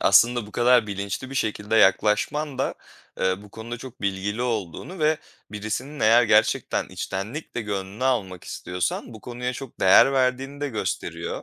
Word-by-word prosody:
aslında 120 +3 +5
bu 105 - -14
kadar 120 -1 +4
bilinçli 100 +5 -4
bir - - -7
şekilde 110 -3 0
yaklaşman 115 +8 +3
da, 135 - 0 0.5
ııı, 95 +1 +1
bu 105 - -14
konuda 115 +2 -7
çok 130 0 -11
bilgili 100 +3 -1
olduğunu 115 - -3
ve 155 0 +2 0.3
birisinin 110 +8 -4
eğer 115 +3 +6
gerçekten 110 -2 +2
içtenlikle 115 +7 -5
gönlünü 100 +2 -4
almak 95 -9 0
istiyorsan, 90 +6 -3
bu 110 - -11
konuya 125 +2 -4
çok 130 0 -9
değer 95 +8 +7
verdiğini 135 +2 0
de 145 - -1
gösteriyor. 110 -5 -3
110 Hz, 150 wpm, -24 LUFS, 100-130 Hz, 0.5 s, değer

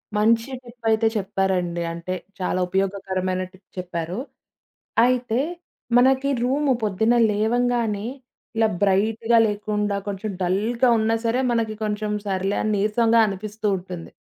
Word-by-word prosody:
మంచి 225 +3 +3 0.2
టిప్పయితే 225 -2 0
చెప్పారండి. 185 -3 -1
అంటే, 170 +2 -4 0.3
చాలా 185 0 0
ఉపయోగకరమైన 190 -1 -1
టిప్ 190 0 -21
చెప్పారు. 175 +1 -4 0.9
అయితే 245 -2 +1 0.6
మనకి 265 +2 +4
రూము 275 +3 +1
పొద్దున్న 220 +3 +2 0.2
లేవంగానే 225 0 0 0.5
ఇలా 225 0 +4
బ్రైట్‌గా 220 +4 +2
లేకుండా 210 0 -1
కొంచెం 205 +1 -3
డల్‌గా 215 +8 +1
ఉన్నా 220 +1 +2
సరే 230 +2 +1
మనకి 225 -2 0
కొంచెం 210 0 -2 0.2
సర్లే 195 +1 0
అని 215 - 0
నీరసంగా 225 +3 +3
అనిపిస్తూ 210 +2 -4
ఉంటుంది. 180 -2 -8
210 Hz, 115 wpm, -23 LUFS, 190-230 Hz, 0.9 s, మనకి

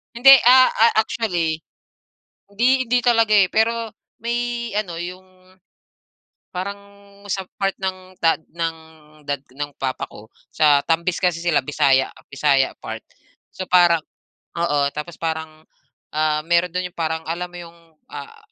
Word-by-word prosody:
Hindi, 270 +3 +7 0.2
ah, 255 +1 +7
ah, 230 +1 +3
actually, 175 -9 -2 0.9
hindi 250 +5 +2
hindi 245 +1 +1
talaga, 230 -3 +3
eh, 195 -3 +5
pero 230 0 +1 0.3
may 240 0 -2
ano 180 -5 -3
yung, 185 +2 -10 1.0
parang 200 +3 -4 0.5
sa 195 -1 -2 0.2
part 195 -1 0
ng 185 0 -5
ta 165 -1 +3
ng 165 0 -4 0.5
dad 140 -2 -2
ng 145 +2 -6
papa 130 -1 -2
ko 105 - -13 0.3
sa 145 -2 +4
Tambis 170 +2 0
kasi 175 -2 0
sila 150 -6 +1
Bisaya 135 -2 +2 0.2
Bisaya 140 -1 +1
part. - - -7 0.5
So, 185 - -7
parang, 175 -3 +4 0.6
oo 150 -4 +1 0.2
tapos 150 +3 -7
parang, 160 -1 -5 0.5
ah, 155 0 +1
meron 170 +1 +2
do'n 180 0 -2
'yong - - -33
parang 160 0 -2
alam 175 +2 -4
mo 175 - -11
'yong, 170 -1 -11 0.4
ah, 450 0 -9
175 Hz, 140 wpm, -21 LUFS, 160-210 Hz, 1.0 s, Hindi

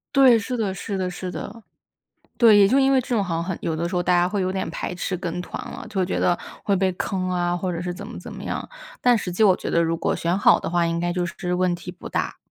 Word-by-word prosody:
对， 260 -4 +7
是 250 +4 -4
的， 215 -5 -1
是 195 +1 -4
的， 185 -1 -1
是 180 0 -5
的。 225 +5 -7 0.8
对， 225 -3 +7
也 200 -1 +6
就 265 - +4
因 270 0 +4
为 265 - +4
这 255 - -11
种 225 -5 +1
好 175 -3 -2
像 165 - -1
很 175 0 -4
有 165 - -1
的 170 +2 -2
时 180 - -3
候 175 - +2
大 180 +1 +2
家 175 0 +3
会 205 +1 -1
有 185 0 -1
点 190 0 -2
排 - - -4
斥 180 +1 -3
跟 175 -1 -4
团 - - -6
了。 - - -8
就 195 -3 0
觉 180 - -2
得 175 - +2 0.2
会 200 - +1
被 190 0 +1
坑 185 0 -2
啊， 175 -1 0
或 180 +1 -2
者 170 0 -4
是 180 0 -3
怎 200 +3 -8
么， 235 - -9
怎 - - -9
么 - - -8
样， - - -4 0.3
但 245 -2 +4
实 180 -3 -4
际 180 - 0
我 190 -4 +6
觉 - - -5
得 170 - +2
如 165 0 0
果 - - 0
选 170 +3 0
好 - - +5
的 - - -4
话， 170 -1 +2
应 165 0 -1
该 175 0 0
就 175 0 -1
是 175 +2 -4
问 180 0 +1
题 175 +1 -7
不 180 - -10
大。 - - -2
180 Hz, 315 characters per minute, -23 LUFS, 175-200 Hz, 0.8 s, 对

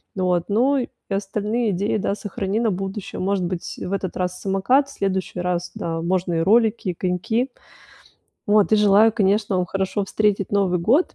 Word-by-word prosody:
Вот, 180 -2 +1
ну, 255 +7 +3
и 255 - -1 0.3
остальные 210 +3 -1
идеи, 200 +4 0
да, 200 - -1
сохрани 205 +1 -3
на 225 -3 +1
будущее. 195 +2 -5
Может 190 -1 0
быть, 175 -1 -5
в 190 - -4
этот 190 -2 -3
раз 180 0 -2
самокат, 205 +9 +2
в - - -11
следующий 190 -3 -2
раз, 180 0 -2
да, 165 -1 -3
можно 180 +1 0
и - - +1
ролики, 215 0 +2
коньки. 185 +8 -1 1.0
Вот 210 0 +4
и - - +7
желаю, 210 +1 +5
конечно, 205 -1 +1
вам 180 - +1
хорошо 195 +3 -2
встретить 200 -1 0
Новый 195 -3 +2
год, 245 - +2
195 Hz, 170 wpm, -22 LUFS, 180-215 Hz, 1.0 s, и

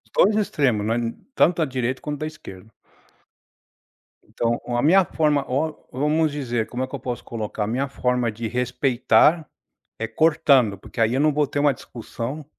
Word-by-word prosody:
2 210 +3 +4
extremos, 135 - +1
não 110 - +1
é 120 - 0 0.3
tanto 175 -7 +3
da 160 - +2
direita 130 -1 -3
quanto 145 -1 -5
da 155 - -3
esquerda. 110 -9 -12 1.6
Então, 120 0 -1
a 120 0 0
minha 185 +7 +5
forma 150 -3 +1
o 150 +4 -1 0.2
vamos 150 +4 +1
dizer, 120 -6 -2
como 125 - -5
é - - -3
que 135 - -7
eu 135 - -6
posso 125 -1 -5
colocar, 110 -2 -4
a 105 - -2
minha 130 +5 -1
forma 125 -3 0
de 115 +2 -5
respeitar 125 +5 +2 0.5
é 115 - -2
cortando, 140 -5 +3
porque 100 - -11
aí 115 +1 +3
eu 130 - +1
não 150 -1 +3
vou 150 0 +2
ter 145 - -3
uma 145 -1 +3
discussão, 125 +4 -7
130 Hz, 180 wpm, -23 LUFS, 120-150 Hz, 1.6 s, minha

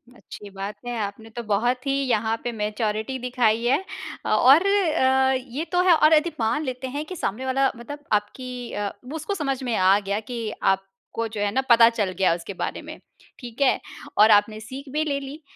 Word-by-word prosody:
अच्छी 205 -3 -11
बात 195 +1 -6
है, 245 -1 -3
आपने 205 +2 -6
तो 240 - -4
बहुत 240 +5 0
ही 275 - +2 0.2
यहाँ 220 -1 +1
पे 240 - -2
मैच्योरिटी 215 +2 -2
दिखाई 240 -2 +1
है। 275 +9 +2 0.4
अ, - - -2
और 280 +9 +6
अ, 265 -9 +3
ये 260 +4 -4
तो 360 - +3
है 355 - +8
और 310 0 +5
यदि 315 +2 +3
मान 230 +7 0
लेते 260 -1 -4
हैं 290 +4 -4
कि 370 - -7
सामने 255 - -3
वाला 265 +1 +2
मतलब 290 +5 -9
आपकी 245 +4 -3
अ, 205 - -2 0.2
वो 275 +5 -7
उसको 320 +6 -3
समझ 275 -7 -2
में 240 -3 -1
आ 190 +1 +4
गया 200 0 -2
कि 230 0 -5
आपको 195 +4 -2
जो 215 -2 -4
है 205 0 +1
ना 265 - +1
पता 230 -1 +8
चल 210 -5 -1
गया 190 -3 +3
उसके 175 +3 -7
बारे - - -4
में, - - -10 0.4
ठीक 245 0 -9
है। 275 - +4 0.4
और 215 +1 +7
आपने 210 +1 +3
सीख 260 +5 -9
भी 305 +1 +1
ले 285 -3 -1
ली 280 +3 -9
240 Hz, 210 wpm, -24 LUFS, 210-270 Hz, 0.4 s, है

